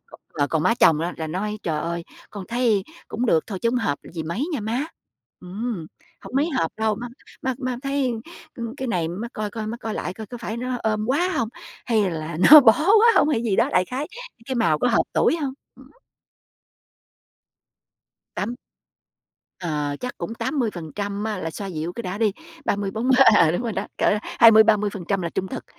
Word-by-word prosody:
Còn -, -, -15 dB, 0.2 s
mà 145 Hz, -, +3 dB
còn 160 Hz, -1 st, 0 dB
má 230 Hz, -, +3 dB
chồng 160 Hz, -9 st, +4 dB
á 170 Hz, +2 st, -2 dB
là 160 Hz, -, -4 dB
nói: 205 Hz, +6 st, -3 dB
"Trời 155 Hz, -2 st, -1 dB
ơi, 170 Hz, 0 st, -3 dB, 0.3 s
con 200 Hz, -3 st, -8 dB
thấy 230 Hz, -5 st, +1 dB, 0.2 s
cũng 240 Hz, +3 st, -2 dB
được 165 Hz, -7 st, +3 dB
thôi, 195 Hz, -4 st, -5 dB
chứ 230 Hz, -, +2 dB
hông 250 Hz, -, +1 dB
hợp 145 Hz, -, -1 dB
gì 165 Hz, -2 st, -4 dB
mấy 185 Hz, -, -2 dB
nha 265 Hz, -, -2 dB
má. 230 Hz, +7 st, -1 dB, 0.6 s
Ừm, 190 Hz, -1 st, -5 dB, 0.3 s
hổng -, -, -11 dB
mấy 305 Hz, +4 st, +2 dB
hợp 165 Hz, -, -1 dB
đâu, 220 Hz, 0 st, +1 dB
má 240 Hz, +3 st, -6 dB, 0.4 s
má 260 Hz, -1 st, -1 dB
má 255 Hz, -3 st, -3 dB
thấy, 275 Hz, -2 st, 0 dB, 0.4 s
ừm, 235 Hz, +1 st, -5 dB
cái 265 Hz, -3 st, -4 dB
này 170 Hz, -7 st, 0 dB
má 200 Hz, +8 st, -5 dB
coi 210 Hz, -1 st, -4 dB
coi, 215 Hz, 0 st, -5 dB
má 230 Hz, -, -4 dB
coi 225 Hz, -2 st, -5 dB
lại -, -, -4 dB
coi 220 Hz, 0 st, -8 dB
có 245 Hz, +4 st, -8 dB
phải 225 Hz, -1 st, -5 dB
nó 250 Hz, +1 st, -3 dB
ôm 215 Hz, -1 st, 0 dB
quá 295 Hz, +9 st, +1 dB
hông? 225 Hz, -, 0 dB, 0.4 s
Hay 215 Hz, -5 st, +2 dB
là 160 Hz, -1 st, -5 dB
nó 305 Hz, -, +13 dB
bó 235 Hz, -5 st, +7 dB
quá 420 Hz, +8 st, +5 dB
hông?" -, -, +5 dB
hay 235 Hz, -7 st, +1 dB
gì 215 Hz, -5 st, 0 dB
đó, -, -, +3 dB
đại 180 Hz, 0 st, +3 dB
khái: 265 Hz, +7 st, -4 dB, 0.4 s
"Cái 265 Hz, -, -2 dB
màu 225 Hz, -11 st, +2 dB
có 250 Hz, -, +2 dB
hợp 230 Hz, -, +3 dB
tuổi 335 Hz, -, +3 dB
hông?" 280 Hz, -5 st, -3 dB, 0.2 s
Ứm. -, -, -17 dB, 2.5 s
Tám 235 Hz, +4 st, -3 dB, 1.0 s
ờ, 150 Hz, -5 st, -2 dB
chắc 250 Hz, 0 st, -5 dB
cũng 225 Hz, -, -5 dB
80% 205 Hz, -, -3 dB
á 220 Hz, -1 st, -2 dB
là 165 Hz, -3 st, -4 dB
xoa 200 Hz, +5 st, -6 dB
dịu 165 Hz, -1 st, -4 dB
cái 235 Hz, -, -6 dB
đã 185 Hz, 0 st, -4 dB
đi, 215 Hz, -2 st, +2 dB, 0.3 s
30-40 215 Hz, +5 st, 0 dB, 0.2 s
à, 165 Hz, -6 st, +5 dB
đúng 175 Hz, +7 st, -1 dB
rồi 235 Hz, -2 st, -2 dB
đó, 200 Hz, 0 st, -3 dB
cỡ 210 Hz, -, +3 dB
20-30% 210 Hz, -4 st, +4 dB
là 170 Hz, -, -1 dB
trung 190 Hz, -, -3 dB
thực, -, -, -6 dB
215 Hz, 200 wpm, -23 LUFS, 180-245 Hz, 2.5 s, nó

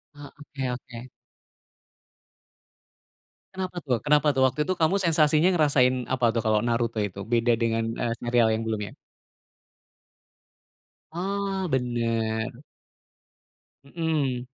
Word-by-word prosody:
Eee, 145 Hz, -, -11 dB
oke 140 Hz, -3 st, -6 dB
oke. 125 Hz, 0 st, -8 dB, 2.5 s
Kenapa 185 Hz, -1 st, -4 dB
tuh 125 Hz, -5 st, 0 dB
kenapa 150 Hz, 0 st, +2 dB
tuh? 130 Hz, -1 st, +1 dB
Waktu 130 Hz, +4 st, -1 dB
itu 185 Hz, -, -1 dB
kamu 160 Hz, +4 st, +3 dB
sensasinya 155 Hz, 0 st, +3 dB
ngerasain 130 Hz, -6 st, +2 dB
apa 120 Hz, -3 st, +1 dB
tuh 115 Hz, -, -1 dB
kalau 110 Hz, -1 st, +1 dB
Naruto 115 Hz, -2 st, 0 dB
itu 100 Hz, -1 st, -5 dB
beda 120 Hz, 0 st, +2 dB
dengan, 115 Hz, -1 st, 0 dB, 0.2 s
eee, 115 Hz, -1 st, 0 dB
serial 120 Hz, -1 st, +3 dB
yang 115 Hz, -, -3 dB
belum 110 Hz, -1 st, -2 dB
ya? -, -, -10 dB, 2.2 s
Oh, 195 Hz, +1 st, -2 dB
bener. 115 Hz, -1 st, -1 dB, 1.2 s
Mmm. 140 Hz, -5 st, -2 dB
125 Hz, 110 wpm, -25 LUFS, 115-150 Hz, 2.5 s, kamu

